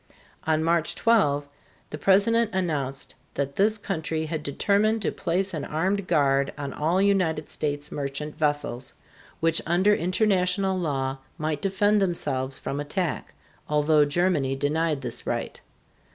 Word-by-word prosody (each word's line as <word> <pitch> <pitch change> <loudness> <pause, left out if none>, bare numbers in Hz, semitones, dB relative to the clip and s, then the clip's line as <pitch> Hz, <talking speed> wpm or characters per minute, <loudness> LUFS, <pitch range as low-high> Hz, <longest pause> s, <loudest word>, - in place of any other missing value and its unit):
On 160 0 +2
March 165 0 +1
12 145 -12 +2 0.4
the 150 - -4
President 205 +5 +3
announced 145 -7 -2 0.2
that 140 0 -2
this 215 +2 +3
country 160 -5 -3
had 155 0 -3
determined 205 +9 +1
to - - 0
place 190 +3 -1
an 155 -3 -3
armed 185 +5 -1
guard 140 -1 +2
on 140 -2 -5
all 165 +5 +1
United 185 -6 +1
States 145 -1 -3
merchant 145 +1 -4
vessels, 145 -5 -2 0.5
which 165 0 +2
under 185 +5 +4
international 190 0 +1
law 135 -6 -2 0.2
might 155 -1 -2
defend 205 +2 +2
themselves 135 -8 -1
from 140 - -4
attack, 150 +3 -3 0.3
although 150 0 +4
Germany 145 -3 +1
denied 150 +1 0
this 120 -2 -5
right. - - -3
160 Hz, 135 wpm, -25 LUFS, 145-190 Hz, 0.5 s, under